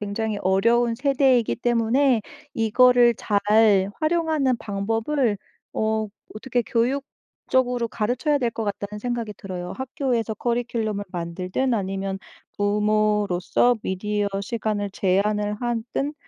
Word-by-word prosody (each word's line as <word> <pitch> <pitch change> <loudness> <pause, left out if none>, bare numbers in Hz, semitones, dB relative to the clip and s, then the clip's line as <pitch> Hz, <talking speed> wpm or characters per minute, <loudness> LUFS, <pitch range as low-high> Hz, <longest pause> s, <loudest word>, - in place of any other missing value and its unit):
굉장히 210 +1 -2
어려운 230 +5 +3
세대이기 265 -2 +2
때문에 240 +1 +2 0.3
이거를 240 +2 +5
잘 205 -2 +3
활용하는 310 -5 +1
방법을 225 +5 -1 0.4
어 220 0 0 0.3
어떻게 245 +2 -1
교육적으로 250 0 -1
가르쳐야 250 +8 0
될 240 -3 0
것 225 - -5
같다는 205 0 -4
생각이 235 -2 -3
들어요. 180 -2 -6
학교에서 260 -4 -2
커리큘럼을 230 -3 -2
만들든 180 +8 -2
아니면 195 -1 -2 0.4
부모로서 210 +1 +2
미디어 205 +2 -1
시간을 210 -1 -2
제한을 205 +2 +1
하든 240 +4 -2
225 Hz, 285 characters per minute, -23 LUFS, 205-245 Hz, 0.4 s, 이거를